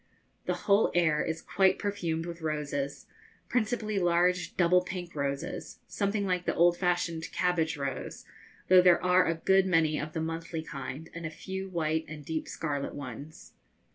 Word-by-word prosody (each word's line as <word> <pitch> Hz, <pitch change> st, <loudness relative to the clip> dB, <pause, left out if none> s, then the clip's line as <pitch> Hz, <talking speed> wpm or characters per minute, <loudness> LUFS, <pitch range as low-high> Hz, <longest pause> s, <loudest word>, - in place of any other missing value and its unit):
The -, -, +1 dB
whole 200 Hz, +1 st, +4 dB
air 160 Hz, -4 st, +3 dB
is 160 Hz, 0 st, -3 dB
quite 190 Hz, -1 st, +3 dB
perfumed 170 Hz, -6 st, -2 dB
with 170 Hz, -1 st, -7 dB
roses, 145 Hz, -3 st, -3 dB, 0.4 s
principally 215 Hz, -3 st, 0 dB
large 175 Hz, 0 st, +2 dB
double 180 Hz, 0 st, +5 dB
pink 180 Hz, -1 st, -6 dB
roses, 140 Hz, -1 st, -4 dB
something 200 Hz, 0 st, -1 dB
like 180 Hz, -2 st, -1 dB
the -, -, 0 dB
old 175 Hz, +1 st, +5 dB
fashioned 175 Hz, -2 st, -1 dB
cabbage 170 Hz, -4 st, 0 dB
rose, 140 Hz, -2 st, -5 dB, 0.4 s
though 185 Hz, 0 st, +8 dB
there 180 Hz, -1 st, +5 dB
are 180 Hz, 0 st, +4 dB
a 165 Hz, -, +1 dB
good 190 Hz, +3 st, +3 dB
many 160 Hz, -4 st, +2 dB
of 155 Hz, 0 st, -5 dB
the -, -, -2 dB
monthly 165 Hz, 0 st, -4 dB
kind 140 Hz, +1 st, -6 dB
and 170 Hz, -, -7 dB
a -, -, -5 dB
few 190 Hz, +4 st, -6 dB
white 160 Hz, -2 st, -1 dB
and 150 Hz, -2 st, -9 dB
deep 160 Hz, +1 st, -3 dB
scarlet 145 Hz, -3 st, -3 dB
ones. 145 Hz, +4 st, -9 dB
170 Hz, 165 wpm, -29 LUFS, 155-180 Hz, 0.4 s, though